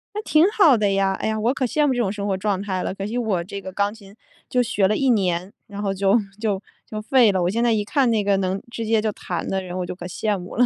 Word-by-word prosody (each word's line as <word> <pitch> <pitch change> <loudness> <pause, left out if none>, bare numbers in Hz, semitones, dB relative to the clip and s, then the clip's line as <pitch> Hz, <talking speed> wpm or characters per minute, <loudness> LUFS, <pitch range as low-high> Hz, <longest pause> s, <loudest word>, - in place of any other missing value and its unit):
那 425 - -1
挺 310 -5 +4
好 330 - +5
的 205 -2 +1
呀。 195 0 +2
哎 - - -2
呀， 220 0 -1
我 235 +5 +1
可 260 - -1
羡 295 +5 +1
慕 270 - +2
这 245 - -3
种 200 -5 +1
生 205 -1 -4
活 195 - 0
状 195 0 -1
态 190 -2 -2
了， - - -3
可 195 0 -5
惜 225 - -4
我 210 -8 0
这 200 +2 -6
个 190 -1 -8
钢 200 +2 0
琴 200 -2 -15 0.3
就 250 -1 +2
学 200 -4 +1
了 215 - +1
1 270 -2 +2
年， 185 -3 0
然 205 0 -7
后 195 -1 -1
就 195 +2 +3 0.2
就 205 -4 0 0.3
就 215 - -5
废 235 0 +4
了。 185 -2 0
我 175 - +1
现 230 +4 -1
在 240 - +3
一 210 -2 +1
看 260 +1 +2
那 215 -3 +1
个 200 -1 +3
能 190 0 -1
直 230 -1 -4
接 220 0 +2
就 215 -1 -1
弹 175 -3 -5
的 190 0 -1
人， 180 0 -7
我 180 - -2
就 - - -5
可 175 -1 -8
羡 205 +3 -1
慕 180 +3 -9
了。 245 - +5
205 Hz, 315 characters per minute, -22 LUFS, 190-230 Hz, 0.3 s, 好